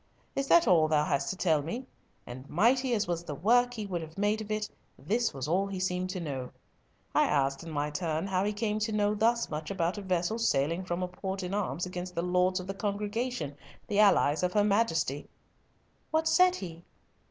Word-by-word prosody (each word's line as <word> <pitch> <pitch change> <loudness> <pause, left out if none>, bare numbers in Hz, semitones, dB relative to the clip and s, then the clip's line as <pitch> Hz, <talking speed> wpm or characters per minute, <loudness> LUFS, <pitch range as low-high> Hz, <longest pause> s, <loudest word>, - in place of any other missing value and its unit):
Is 275 0 -1
that 340 +3 +5
all 160 -3 +5
thou 150 -1 +2
hast 140 -1 0
to - - -2
tell 160 -5 +2
me? 230 - -5 0.4
And 130 +3 -9
mighty 245 - +3
as 210 - 0
was 170 -1 -2
the 150 -4 -5
work 245 - +3
he 215 -2 -4
would 180 -4 -3
have 160 +1 -10
made 205 +2 +1
of 215 - -8
it, 215 0 -1 0.3
this 220 - 0
was 135 0 -5
all 190 +5 +1
he 195 -1 -5
seemed 185 0 -1
to 185 0 -3
know. 135 -6 -4 0.6
I - - +4
asked, 135 0 +1
in 165 - -8
my 150 -1 -2
turn, 160 +1 -2
how 190 -1 0
he 205 - 0
came 210 0 -1
to 215 +1 -1
know 210 -1 +2
thus 230 +1 +1
much 155 0 -4
about 185 +1 -1
a - - -6
vessel 185 +3 -1
sailing 165 -3 +1
from 175 0 -2
a - - -1
port 190 +1 -5
in 180 +1 -4
arms 200 -3 -1
against 180 0 -6
the 170 - -1
Lords 180 +1 +2
of 185 - -6
the 195 - -4
Congregation, 205 - -3 0.3
the 205 -2 0
allies 195 -7 +4
of 180 0 0
her 210 - +4
Majesty?" 200 - +1 0.8
"What 320 0 +1
said 365 +2 +5
he?" 170 - -8
185 Hz, 215 wpm, -30 LUFS, 165-210 Hz, 0.8 s, that